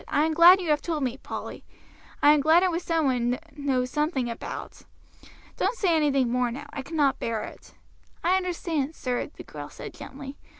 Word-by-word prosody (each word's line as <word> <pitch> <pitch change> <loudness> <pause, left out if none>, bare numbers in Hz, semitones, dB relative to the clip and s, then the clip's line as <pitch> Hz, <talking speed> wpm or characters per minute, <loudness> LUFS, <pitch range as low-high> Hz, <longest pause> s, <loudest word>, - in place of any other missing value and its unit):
"I 295 +2 +2
am 320 - 0
glad 345 +3 +8
you 345 -4 -1
have 295 - +2
told 315 -4 -2
me, 250 -1 -1
Polly. - - -7 0.6
I 295 - +8
am 300 - +3
glad 320 +5 +5
it 370 - +2
was 335 +1 -2
some 330 -3 0
one 245 -3 +1
one 250 - -4 0.2
knows 260 -4 -1
something 290 -5 0
about. 230 - -7 0.8
Don't 485 - 0
say 355 -5 +2
anything 280 -5 +2
more 250 0 +1
now, 270 +5 -7
I 280 - -4
cannot 280 -1 0
bear 225 -2 -2
it." - - -11 0.5
"I 360 +2 +3
understand, 335 -5 -2
sir," 250 -1 -2
the - - -12
girl - - -9
said - - -9
gently. 275 0 -9
290 Hz, 200 wpm, -26 LUFS, 265-330 Hz, 0.8 s, glad